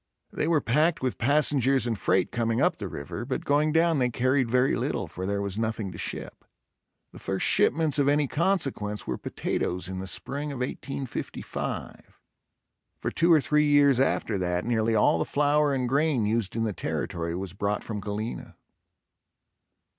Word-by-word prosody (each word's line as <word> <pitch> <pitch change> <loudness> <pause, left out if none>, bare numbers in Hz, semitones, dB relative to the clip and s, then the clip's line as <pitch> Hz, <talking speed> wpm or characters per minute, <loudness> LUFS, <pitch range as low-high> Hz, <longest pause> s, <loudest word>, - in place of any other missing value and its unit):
They - - -1
were 160 -3 +3
packed 155 +5 +1
with 130 - -2
passengers 135 -1 +3
and 120 -2 -1
freight 95 -2 +1
coming 115 -1 0
up - - +2
the - - -5
river, 70 - -6
but 130 +2 -4
going 150 +2 +2
down 165 -1 +3
they 125 -1 +2
carried 130 +1 +1
very 125 +2 +2
little, - - -2
for 95 +1 -6
there 100 0 -1
was 100 +1 -4
nothing 110 -3 -2
to 85 - -9
ship. - - -5 0.7
The - - -12
first 95 -1 -1
shipments 155 -3 +3
of 140 - +3
any 145 0 +3
consequence 140 - -1
were 65 - -3
potatoes 90 0 -2
in 95 0 -5
the 95 - -5
spring 140 - -4
of 140 - -6
1855. 135 +1 -5 0.8
For - - -3
two 170 +1 +2
or 160 -3 +6
three 150 +2 +2
years 145 -3 +5
after 130 -6 +1
that 90 0 -1
nearly 115 -1 +1
all 105 -5 +3
the - - +2
flour 145 - +2
and 130 -2 0
grain 140 -3 +1
used 110 -2 -1
in 115 - 0
the 110 -2 -1
territory 85 -2 -3
was 95 -1 -5
brought 100 +1 -2
from 110 -2 -5
Galena. 105 +3 -5
125 Hz, 175 wpm, -27 LUFS, 105-145 Hz, 0.8 s, or